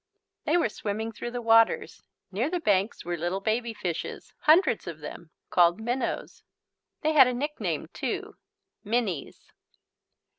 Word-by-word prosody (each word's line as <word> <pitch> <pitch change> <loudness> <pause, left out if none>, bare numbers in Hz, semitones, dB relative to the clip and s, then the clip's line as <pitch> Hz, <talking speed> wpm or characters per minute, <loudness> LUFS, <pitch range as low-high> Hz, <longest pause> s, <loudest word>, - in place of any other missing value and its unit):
They 315 +4 +3
were 335 - +3
swimming 215 +2 -3
through 235 +2 -6
the 240 0 -5
waters. 225 0 +3 0.3
Near 225 +9 0
the 355 +1 -1
banks 205 - +1
were 175 0 -1
little 175 +3 -2
baby 225 +3 -1
fishes, 175 -6 -5
hundreds 315 - +4
of 170 -3 -5
them, 160 +2 -9 0.2
called 175 +2 +4
minnows. 240 +4 -3 0.6
They 310 0 +1
had 270 -4 +8
a 250 - -1
nickname 295 +4 -2
too, - - -4 0.5
"minnies." 210 - -2
225 Hz, 140 wpm, -27 LUFS, 190-250 Hz, 0.6 s, had